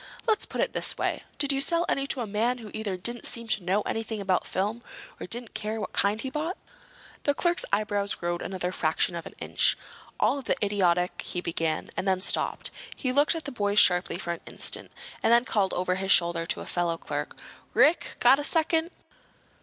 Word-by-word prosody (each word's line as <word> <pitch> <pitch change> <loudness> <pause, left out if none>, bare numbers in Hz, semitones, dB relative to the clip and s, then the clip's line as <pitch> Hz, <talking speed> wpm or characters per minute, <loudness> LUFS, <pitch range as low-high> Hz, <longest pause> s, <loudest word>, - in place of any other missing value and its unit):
"Let's 440 -3 +1
put - - -3
it - - 0
this - - 0
way. - - -1 0.2
Did 285 -1 +2
you 270 - +1
sell 335 +4 +3
any 275 0 0
to 265 - +2
a - - -2
man 220 +4 0
who 220 -4 -10
either 215 -4 -3
didn't 235 +6 -2
seem 235 -1 0
to 215 -5 +3
know 190 +4 +1
anything 225 -1 -3
about 190 -2 0
film, 205 +4 -1
or 240 - -15
who - - -6
didn't 235 +3 0
care 215 +1 -3
what - - -5
kind 205 +2 +1
he 265 +3 -4
bought?" 315 +6 -3 0.6
The 285 - +1
clerk's 345 +2 +2
eyebrows 205 -1 +1
rose 175 0 -2
another 180 -1 -3
fraction 160 0 +1
of 170 -1 -6
an - - -12
inch. - - +1 0.3
"Of - - -24
all 280 - +2
the - - 0
idiotic—" 180 -3 +1
he 180 - -4
began, 165 -2 -2
and 195 - -3
then 190 -1 +2
stopped. 190 - +1 0.2
He 255 - -2
looked 290 +5 +3
at 325 - -5
the 285 - -4
boys 205 -4 -1
sharply 180 -3 +4
for 175 -2 -3
an 170 - -9
instant, - - -1 0.3
and - - +2
then 235 +1 +5
called 200 -5 +1
over 180 0 0
his 190 +1 -1
shoulder 170 -1 +3
to - - -2
a - - -7
fellow 170 -1 -1
clerk. - - -5 0.4
"Rick! 320 +3 +3
Got 275 - +6
a - - -2
second?" 325 +1 +2
210 Hz, 215 wpm, -27 LUFS, 185-265 Hz, 0.6 s, Got